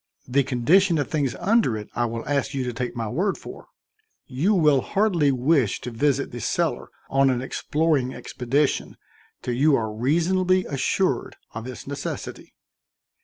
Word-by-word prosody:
The 135 +3 +3
condition 160 +8 +3
of 145 - -2
things 140 -5 0
under 205 - +2
it 105 - -7
I 120 - 0
will 115 0 -5
ask 140 -1 -1
you 135 - -1
to 125 -1 -3
take 120 +1 -4
my 115 -2 -3
word 185 - -1
for; - - -11 0.6
you 150 +11 +1
will 150 -6 +4
hardly 185 - +2
wish 130 -2 +2
to 125 - -5
visit 140 +3 0
the 120 - -6
cellar - - -1 0.2
on 135 0 +4
an 125 -1 0
exploring 145 -2 0
expedition 135 +4 -1 0.5
till 125 - -2
you 140 +4 +4
are 110 -4 -2
reasonably 180 - +2
assured 140 +1 -1 0.2
of 115 +2 -6
its 130 - -8
necessity." 140 0 -6
135 Hz, 160 wpm, -24 LUFS, 125-160 Hz, 0.6 s, will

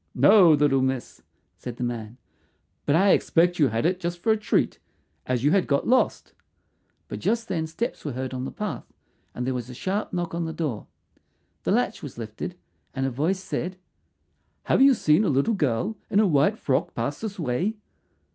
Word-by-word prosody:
"No, 195 -5 +7
little 145 -3 +3
miss," 130 -1 -2 0.4
said 125 -2 -7
the - - -3
man. 120 -1 -4 0.7
"But 145 - +3
I 195 +3 +5
expect 175 +1 +2
you 145 - +5
had 115 +3 -1
it 180 +2 +1
just 175 -1 -3
for 220 +6 +1
a - - +4
treat, 215 0 0 0.5
as 125 -1 0
you 145 - +4
had 195 -2 +2
got 140 -1 +1
lost." 255 +1 +1 0.7
But - - -6
just 230 0 0
then 160 -5 -2
steps 230 +10 -4
were 145 - -4
heard 130 +1 -4
on 130 0 -4
the 135 - -4
path, 210 -1 -5 0.4
and 125 - -3
there 130 - -1
was 125 -1 -5
a 125 - -8
sharp 195 - -2
knock 175 -2 -3
at 170 0 -2
the 160 0 -4
door. 145 -11 -3 0.8
The - - +1
latch - - 0
was - - -9
lifted, 115 +9 -6 0.4
and 135 0 -1
a 135 - -1
voice 170 +9 -1
said, 185 0 -4 0.9
"Have - - +2
you 270 -1 +7
seen 155 0 +3
a - - +1
little 140 - +2
girl 155 - 0
in 205 -2 +3
a 215 - +5
white 160 +4 +3
frock 135 -9 -1
pass 130 +5 -3
this 215 -2 -5
way?" 170 - -1
160 Hz, 195 wpm, -25 LUFS, 130-195 Hz, 0.9 s, No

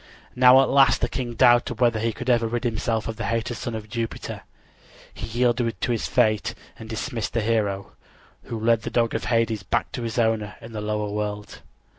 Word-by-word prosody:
Now 125 +1 +7
at - - -1
last 135 0 +4
the - - +2
king 125 -3 -4
doubted 120 0 +4
whether 120 -3 +3
he 115 +1 0
could 125 +3 -8
ever 120 -2 +3
rid 120 +2 -3
himself 115 -2 -1
of 115 -1 -5
the - - -3
hated 115 +1 -1
son 120 0 -5
of 110 -1 -6
Jupiter. 115 0 -5 0.7
He 105 - -6
yielded 120 0 0
to - - -1
his 115 - -1
fate 110 -1 +1 0.2
and 110 - -9
dismissed 115 0 -4
the 115 - +1
hero, 105 -3 -1 0.5
who 115 - -5
led 115 0 +2
the - - -4
dog 115 -1 +1
of - - -2
Hades 115 -3 +1
back 115 +6 -1
to - - -5
his 115 0 -4
owner 110 -3 0
in 115 - -11
the 105 - -4
lower 105 -1 -2
world. 105 0 -4
115 Hz, 205 wpm, -24 LUFS, 110-120 Hz, 0.7 s, Now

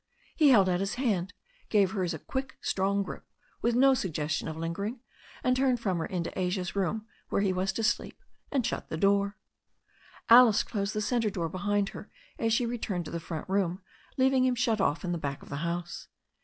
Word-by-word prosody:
He 305 -3 +5
held 205 -8 +6
out 180 -1 +1
his 195 +1 -2
hand, 205 -8 0 0.4
gave 200 -3 +3
hers 185 -5 -1
a 160 - -3
quick, 265 - -5
strong 200 +1 0
grip, - - -8 0.4
with 235 0 +1
no 270 +2 +6
suggestion 160 - -2
of 160 -1 -5
lingering, 200 +9 -3 0.4
and 255 -2 +3
turned 255 -2 +2
from 190 -6 -1
her - - -2
into 175 -3 -3
Asia's 180 0 -2
room, 205 +3 -1 0.2
where 200 - +1
he 190 -2 +2
was 185 +1 0
to 225 - -2
sleep, 235 +2 0 0.3
and 265 -5 +1
shut 245 - -3
the 160 - -3
door. 200 +2 +2 0.9
Alice 235 -2 +7
closed 200 -1 -3
the 215 - 0
centre 230 0 +1
door 170 -4 -3
behind 200 +3 0
her - - -10 0.3
as 225 - +1
she 235 +2 +2
returned 220 -7 -3
to - - -7
the 170 - -3
front 165 -2 -6
room, 190 -1 0 0.3
leaving 260 0 +4
him 255 -1 +2
shut 230 -3 +1
off 170 -1 0
in 175 - -1
the 170 - -1
back 140 -2 -4
of - - -14
the 140 - -4
house. 170 +2 -4
200 Hz, 205 wpm, -29 LUFS, 175-235 Hz, 0.9 s, Alice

